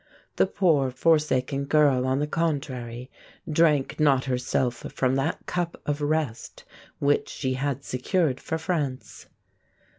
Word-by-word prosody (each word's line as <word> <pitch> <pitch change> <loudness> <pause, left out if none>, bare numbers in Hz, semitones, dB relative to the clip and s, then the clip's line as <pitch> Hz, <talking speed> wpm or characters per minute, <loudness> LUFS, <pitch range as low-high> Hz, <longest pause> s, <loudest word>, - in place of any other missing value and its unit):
The - - +4
poor, 160 -9 +2
forsaken 140 -1 +1
girl, 140 -3 +3
on 130 +1 +1
the 145 - 0
contrary, 135 -6 -3 0.4
drank 155 -3 +2
not 140 -4 +3
herself 125 -1 0 0.2
from 130 -1 +1
that 135 +4 -2
cup 175 -1 -3
of 145 0 -2
rest 145 -6 -2 0.3
which 145 +1 +1
she 130 -2 -2
had 140 +1 -2
secured 140 +2 0
for 160 - -3
France. 155 -6 -3
140 Hz, 125 wpm, -26 LUFS, 130-155 Hz, 0.4 s, The